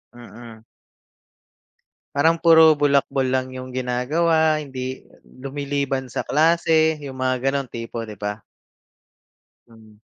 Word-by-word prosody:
Mm. 115 -2 -13 1.5
Parang 160 +4 +3
puro 160 -1 +7
bulakbol 140 -2 +1
lang 130 0 -1
yung 130 0 -8
ginagawa, 155 +5 +1
hindi 130 -2 -6 0.2
lumiliban 140 0 -4
sa 125 - -4
klase 160 0 +2
yung 135 -2 -8
mga 130 +1 0
ganong 140 -1 -2
tipo, 115 0 -6
di 105 - -9
ba? 105 +1 -5 1.3
Hmm. 110 -2 -19
130 Hz, 105 wpm, -22 LUFS, 125-150 Hz, 1.5 s, puro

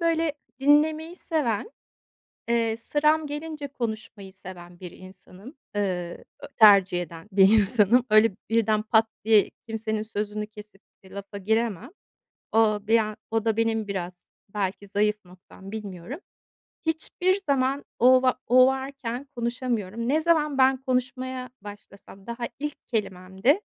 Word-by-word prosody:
böyle, 330 -2 +1 0.3
dinlemeyi 310 +4 +2
seven, 300 - -2 0.8
eee, 230 -1 +1
sıram 300 +6 +1
gelince 295 0 -6
konuşmayı 220 -6 -6
seven 180 -2 -12
bir 180 -2 -8
insanım. 185 - -14 0.2
Iıı, 180 -4 -3 0.2
ö - - -8
tercih 195 -5 +6
eden 170 +2 -11
bir 195 0 +4
insanım. 220 +2 +4
Öyle, 215 +1 +6 0.2
birden 220 -1 +2
pat 220 +1 +3 0.2
diye 215 -2 +4 0.2
kimsenin 220 -1 -3
sözünü 210 -1 -4
kesip 210 -2 -14 0.2
de 190 - -16
lafa 200 0 -8
giremem. 220 - -1 0.6
O 215 -1 +3
bir 225 +1 +5
an 215 -1 -2
o 225 0 0
da 225 -1 +1
benim 225 -2 0
biraz 185 -3 -4 0.4
belki 200 -1 -3
zayıf 210 +1 0
noktam, 185 +2 -14
bilmiyorum. 210 - -7 0.7
Hiçbir 355 +3 0
zaman 275 0 +1
o 255 +2 +6
va 255 -1 +2
o 255 +1 +6
varken 265 -2 -3
konuşamıyorum. 235 -2 -3
Ne 300 +4 +2
zaman 310 -4 +1
ben 265 0 +5
konuşmaya 255 0 -3
başlasam 200 -1 -13
daha 235 0 -4
ilk 295 +1 -6
kelimemde, 195 - 0
225 Hz, 130 wpm, -25 LUFS, 200-260 Hz, 0.8 s, tercih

